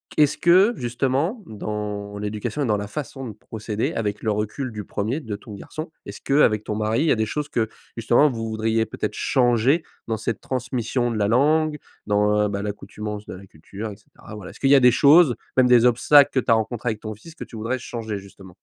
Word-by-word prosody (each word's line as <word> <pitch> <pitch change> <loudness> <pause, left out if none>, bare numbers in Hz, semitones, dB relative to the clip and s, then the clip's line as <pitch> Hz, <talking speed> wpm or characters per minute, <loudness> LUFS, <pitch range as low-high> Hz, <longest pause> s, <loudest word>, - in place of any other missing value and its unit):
Qu'est-ce 150 -1 +3
que, 190 +7 +5
justement, 135 - -1
dans 105 -1 -5
l'éducation 105 +7 -3
et 135 - 0
dans 105 -1 +2
la 100 0 -4
façon 135 +1 -6
de 110 - -7
procéder, 110 +1 -4
avec 105 -2 -2
le 110 - -1
recul 105 +5 -3
du 105 -2 -7
1er, 115 +10 -2
de 110 -5 -5
ton 105 0 -11
garçon, 155 - -8
est-ce - - -9
qu'avec 115 -7 +3
ton 105 - -3
mari, 110 +4 0
il - - +2
y - - +4
a - - +4
des 110 0 0
choses 150 +5 -4
que, 110 -2 0 0.3
justement, 120 +6 +4
vous 115 -3 -4
voudriez 110 0 0
peut - - -11
être - - -1
changer 125 +5 +2 0.3
dans 110 -1 -1
cette 110 +1 -3
transmission 125 -1 -2
de 115 - -2
la 100 -1 +1
langue, 150 +5 +2 0.3
dans, 105 0 +2
bah, 100 0 -3
l'accoutumance 105 0 -6
de - - -8
la 95 +1 -11
culture 100 +8 -8
et 100 - -8
cetera? 105 - -14
Voilà, 95 -3 -9
est-ce - - -16
qu'il 135 - +2
y 140 - +8
a 135 - +7
des 125 -1 +6
choses, 145 0 +6 0.2
même 130 - +6
des 120 -1 +6
obstacles, 140 +4 +6
que 130 - +1
tu 115 - 0
as - - +8
rencontrés 115 +2 -1
avec 110 -1 -3
ton 110 -1 -6
fils 155 +10 -14
que - - -7
tu 115 - -12
voudrais 115 +4 -2
changer, 110 -4 -5
justement? 95 -1 -14
115 Hz, 230 wpm, -23 LUFS, 105-130 Hz, 0.3 s, y